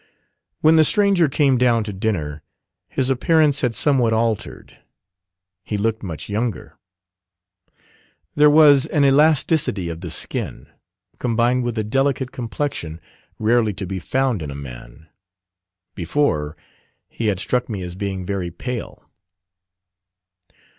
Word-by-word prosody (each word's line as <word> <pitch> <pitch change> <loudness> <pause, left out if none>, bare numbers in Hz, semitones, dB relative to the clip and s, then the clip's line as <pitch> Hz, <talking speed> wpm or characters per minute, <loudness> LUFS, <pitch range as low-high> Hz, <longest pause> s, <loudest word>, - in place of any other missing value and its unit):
When 160 +1 +5
the 160 - +7
stranger 195 -2 +3
came 135 -3 +2
down 120 -3 +3
to 105 -1 -6
dinner 80 -7 -3 0.5
his 130 0 0
appearance 150 +2 +3
had 120 -4 0
somewhat 125 -3 +2
altered; 110 -1 -3 0.8
he 105 - -3
looked 110 +2 -1
much 85 -7 -6
younger. 110 +1 -3 1.6
There 150 0 +5
was 145 -3 +6
an 145 -2 +2
elasticity 140 - +3
of 85 0 -7
the 90 - -6
skin, 80 - -3 0.5
combined 120 +1 +1
with 120 -1 -3
a 110 - 0
delicate 130 +3 0
complexion, 115 - -4 0.4
rarely 110 -2 +1
to 95 - -4
be 95 +1 -4
found 130 +1 -1
in 75 - -5
a 70 - -7
man. 65 +2 -11 0.9
Before, 80 - -1 0.5
he 115 - -4
had 100 -3 0
struck 125 +3 -1
me 100 -4 -4
as 90 -1 -6
being 95 -1 -4
very 95 -2 -3
pale. 120 +7 -7
115 Hz, 125 wpm, -21 LUFS, 95-135 Hz, 1.6 s, the